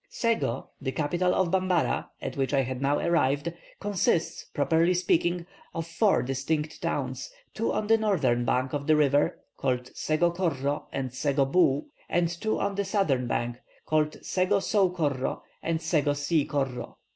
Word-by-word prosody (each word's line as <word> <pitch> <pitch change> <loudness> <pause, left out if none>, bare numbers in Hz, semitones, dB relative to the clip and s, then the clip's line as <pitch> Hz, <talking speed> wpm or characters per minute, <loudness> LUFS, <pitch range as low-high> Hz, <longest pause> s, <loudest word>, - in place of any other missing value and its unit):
"Sego, 225 - -1
the 130 -1 -2
capital 175 +6 +1
of 185 -3 +1
Bambara, 185 -2 +1
at - - -4
which 135 +1 0
I 135 - +4
had 130 0 -4
now 140 +1 +2
arrived, 165 -2 +1 0.3
consists, 190 -5 0
properly 165 +5 +2
speaking, 175 0 +1 0.3
of 165 -1 -2
four 200 +4 +2
distinct 150 +4 -2
towns; 130 -2 -2 0.2
two 225 - -1
on 215 - -1
the 225 +1 +4
northern 185 - +2
bank 130 +2 0
of 140 -1 -3
the 155 - +5
river, 145 -1 +3 0.2
called 125 -1 -1
Sego 165 +3 +1
Korro 145 -5 -1
and 130 -2 -3
Sego 140 +1 +1
Boo, 140 -1 +3 0.2
and 175 -1 +2
two 175 +6 -2
on 200 0 0
the 200 +1 -1
southern 170 - +1
bank, 120 +1 -1 0.3
called 155 -1 +1
Sego 185 +2 +2
Sou 195 -1 +2
Korro 145 -7 -1 0.2
and 165 -1 -1
Sego 155 -3 +1
See 145 +1 +1
Korro. 135 -3 -2
155 Hz, 160 wpm, -27 LUFS, 135-180 Hz, 0.3 s, the